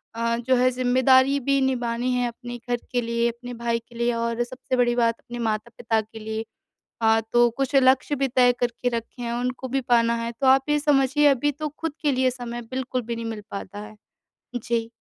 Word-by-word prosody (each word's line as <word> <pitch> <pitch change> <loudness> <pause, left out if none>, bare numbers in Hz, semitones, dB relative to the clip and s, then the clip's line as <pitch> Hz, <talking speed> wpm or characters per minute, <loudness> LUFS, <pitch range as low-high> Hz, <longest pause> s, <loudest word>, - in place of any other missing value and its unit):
अ, 230 0 0
जो 255 +2 +1
है 255 +1 +4
ज़िम्मेदारी 260 +2 +4
भी 275 +2 +2
निभानी 245 -1 0
है 245 -1 +1
अपने 240 +1 -7
घर 240 - +1
के 245 -1 +1
लिए 235 0 0
अपने 245 +1 -8
भाई 235 0 +1
के 235 - -16
लिए 235 0 +1
और 230 +1 -1
सबसे 255 +1 -4
बड़ी 240 -1 +3
बात 230 -1 +2
अपने 240 0 -9
माता-पिता 225 0 -1
के 220 +1 -12
लिए। 220 +1 -4 0.6
हाँ, 225 0 +4
तो 240 0 +5
कुछ 275 +1 -1
लक्ष्य 265 +2 +4
भी 275 0 0
तय 250 0 +4
करके 245 +1 -1
रखे 235 +2 -8
हैं 235 0 -2
उनको 250 +2 -3
भी 270 +1 0
पाना 235 -2 +3
है 235 - -3
तो 265 - +3
आप 270 +2 +4
ये 295 0 +3
समझिए 290 0 +3
अभी 285 +1 +3
तो 305 +1 -4
ख़ुद 310 +1 -5
के 290 - +3
लिए 255 0 +2
समय 240 -1 -6
बिल्कुल 255 -1 -2
भी 235 +1 -4
नहीं 230 - -5
मिल 220 -2 -5
पाता 200 +1 -6
है। 210 +1 -10 0.6
जी। 230 -1 -2
245 Hz, 210 wpm, -24 LUFS, 235-260 Hz, 0.6 s, तो